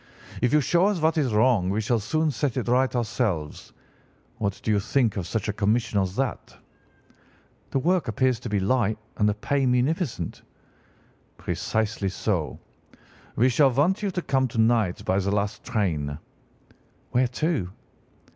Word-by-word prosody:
If 125 Hz, 0 st, +2 dB
you 150 Hz, -, +4 dB
show 175 Hz, +7 st, +3 dB
us 205 Hz, -4 st, 0 dB
what 160 Hz, +1 st, +2 dB
is 135 Hz, -5 st, +1 dB
wrong 110 Hz, -4 st, +3 dB
we 100 Hz, +3 st, 0 dB
shall 115 Hz, +2 st, +1 dB
soon 155 Hz, +9 st, 0 dB
set 140 Hz, -2 st, -2 dB
it 125 Hz, -, -2 dB
right 130 Hz, +2 st, +2 dB
ourselves. 105 Hz, -, -2 dB, 0.7 s
What 100 Hz, -3 st, -2 dB
do 110 Hz, -, 0 dB
you 105 Hz, -, +3 dB
think 115 Hz, +1 st, +1 dB
of 95 Hz, -4 st, -3 dB
such 110 Hz, -3 st, -2 dB
a 105 Hz, -, -1 dB
commission 105 Hz, +1 st, +1 dB
as 95 Hz, 0 st, -3 dB
that?' 135 Hz, +1 st, -3 dB, 1.1 s
"'The -, -, -1 dB
work 175 Hz, +3 st, +1 dB
appears 125 Hz, +2 st, +1 dB
to 120 Hz, -, -6 dB
be 105 Hz, -1 st, +1 dB
light 110 Hz, +1 st, +1 dB, 0.2 s
and 105 Hz, 0 st, +3 dB
the 105 Hz, -, -1 dB
pay 140 Hz, +6 st, -1 dB
munificent.' 125 Hz, -, -1 dB, 1.0 s
"'Precisely 100 Hz, +4 st, -2 dB
so. 95 Hz, -, -2 dB, 0.8 s
We 120 Hz, -, +4 dB
shall 135 Hz, +2 st, +4 dB
want 150 Hz, -, +1 dB
you 205 Hz, -, 0 dB
to 180 Hz, -2 st, -3 dB
come 135 Hz, -1 st, +1 dB
to 115 Hz, -, -8 dB
night 110 Hz, -5 st, +2 dB
by 95 Hz, +1 st, +2 dB
the 100 Hz, 0 st, -1 dB
last 100 Hz, 0 st, -1 dB
train.' 75 Hz, -9 st, -1 dB, 0.9 s
"'Where 125 Hz, +1 st, +3 dB, 0.2 s
to? 145 Hz, -, 0 dB
115 Hz, 165 wpm, -25 LUFS, 100-135 Hz, 1.1 s, you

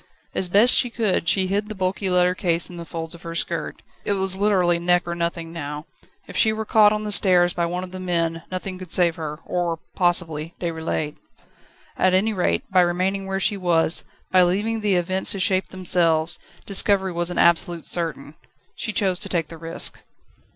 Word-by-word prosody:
As 185 Hz, -, -1 dB
best 210 Hz, +7 st, +5 dB
she 245 Hz, -, +2 dB
could, 215 Hz, -7 st, -1 dB
she 190 Hz, -1 st, +2 dB
hid 205 Hz, +3 st, -1 dB
the 215 Hz, -, -6 dB
bulky 190 Hz, +1 st, -1 dB
leather 180 Hz, 0 st, +3 dB
case 170 Hz, -1 st, 0 dB
in 175 Hz, -, -9 dB
the 170 Hz, -, -7 dB
folds 165 Hz, 0 st, -5 dB
of 170 Hz, -, -11 dB
her 165 Hz, -1 st, -7 dB
skirt. -, -, -3 dB, 0.2 s
It 205 Hz, -, 0 dB
was 190 Hz, -1 st, 0 dB
literally 190 Hz, -4 st, +2 dB
neck 175 Hz, 0 st, +1 dB
or 170 Hz, -, -2 dB
nothing 170 Hz, -1 st, -3 dB
now. 150 Hz, -2 st, -6 dB, 0.4 s
If -, -, -10 dB
she 220 Hz, -, +4 dB
were 220 Hz, 0 st, -3 dB
caught 210 Hz, -1 st, +5 dB
on 215 Hz, 0 st, -2 dB
the 210 Hz, -, -4 dB
stairs 180 Hz, -3 st, +4 dB
by 170 Hz, -1 st, -1 dB
one 180 Hz, +2 st, -3 dB
of 185 Hz, -, -9 dB
the 185 Hz, -, -7 dB
men 165 Hz, -2 st, -1 dB
nothing 185 Hz, 0 st, -5 dB
could 185 Hz, -3 st, -10 dB
save 175 Hz, -2 st, +4 dB
her 150 Hz, -2 st, -5 dB
or 175 Hz, -2 st, -1 dB, 0.2 s
possibly 170 Hz, -3 st, 0 dB
Déroulède. 160 Hz, -3 st, -3 dB, 0.8 s
At 185 Hz, 0 st, +3 dB
any 215 Hz, +4 st, +2 dB
rate, 185 Hz, -3 st, 0 dB
by 185 Hz, -1 st, +5 dB
remaining 185 Hz, +3 st, 0 dB
where 195 Hz, 0 st, -2 dB
she 200 Hz, +1 st, +1 dB
was, 170 Hz, -3 st, +2 dB, 0.3 s
by 185 Hz, -, +6 dB
leaving 205 Hz, +5 st, +1 dB
the 205 Hz, -3 st, +1 dB
events 185 Hz, +2 st, 0 dB
to 195 Hz, -, -5 dB
shape 185 Hz, 0 st, +1 dB
themselves, 170 Hz, -3 st, +1 dB, 0.3 s
discovery 195 Hz, -1 st, +3 dB
was 175 Hz, 0 st, -1 dB
absolutely 170 Hz, -1 st, +2 dB
certain. 160 Hz, -4 st, -3 dB, 0.4 s
She 215 Hz, -, -4 dB
chose 190 Hz, -3 st, +1 dB
to 200 Hz, -, -3 dB
take 170 Hz, -4 st, -1 dB
the 165 Hz, -, -9 dB
risk. 165 Hz, +1 st, -3 dB
180 Hz, 195 wpm, -23 LUFS, 170-195 Hz, 0.8 s, by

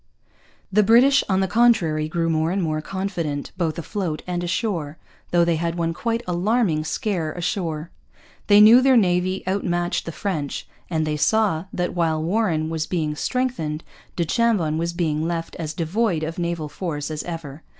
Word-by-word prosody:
The 210 Hz, -, +5 dB
British, 245 Hz, +7 st, +5 dB
on 190 Hz, 0 st, +2 dB
the 190 Hz, -, +1 dB
contrary, 180 Hz, -9 st, +3 dB
grew 165 Hz, +1 st, -1 dB
more 160 Hz, 0 st, +1 dB
and 190 Hz, +1 st, 0 dB
more 155 Hz, -1 st, -1 dB
confident, 170 Hz, -6 st, -3 dB
both 170 Hz, -4 st, -1 dB
afloat 170 Hz, -2 st, -3 dB
and 175 Hz, -1 st, -3 dB
ashore, 170 Hz, -4 st, -2 dB, 0.3 s
though 175 Hz, -1 st, +3 dB
they 170 Hz, -1 st, +1 dB
had 170 Hz, +1 st, -2 dB
one 165 Hz, -1 st, -1 dB
quite 230 Hz, +6 st, -2 dB
alarming 180 Hz, -2 st, +1 dB
scare 160 Hz, +2 st, -2 dB
ashore. 170 Hz, -3 st, -3 dB, 0.6 s
They 205 Hz, 0 st, +7 dB
knew 225 Hz, +4 st, +9 dB
their 260 Hz, -1 st, +5 dB
navy 185 Hz, -2 st, +1 dB
outmatched 175 Hz, -3 st, -1 dB
the -, -, -2 dB
French; 155 Hz, -3 st, -3 dB, 0.2 s
and 160 Hz, -3 st, 0 dB
they 150 Hz, -1 st, -1 dB
saw 195 Hz, -2 st, +2 dB
that, 180 Hz, 0 st, -2 dB
while 165 Hz, -3 st, +1 dB
Warren 165 Hz, -2 st, 0 dB
was 160 Hz, -1 st, -2 dB
being 155 Hz, -4 st, -1 dB
strengthened, 170 Hz, -9 st, -2 dB, 0.3 s
du 170 Hz, -, 0 dB
Chambon 180 Hz, -6 st, +1 dB
was 170 Hz, +1 st, -1 dB
being 160 Hz, -2 st, -1 dB
left 165 Hz, -1 st, -3 dB
as 160 Hz, -3 st, -4 dB
devoid 170 Hz, +2 st, 0 dB
of 165 Hz, +2 st, -4 dB
naval 170 Hz, -3 st, -2 dB
force 150 Hz, -2 st, -4 dB
as 155 Hz, -1 st, -3 dB
ever. 160 Hz, -4 st, -7 dB
170 Hz, 170 wpm, -23 LUFS, 155-195 Hz, 0.6 s, knew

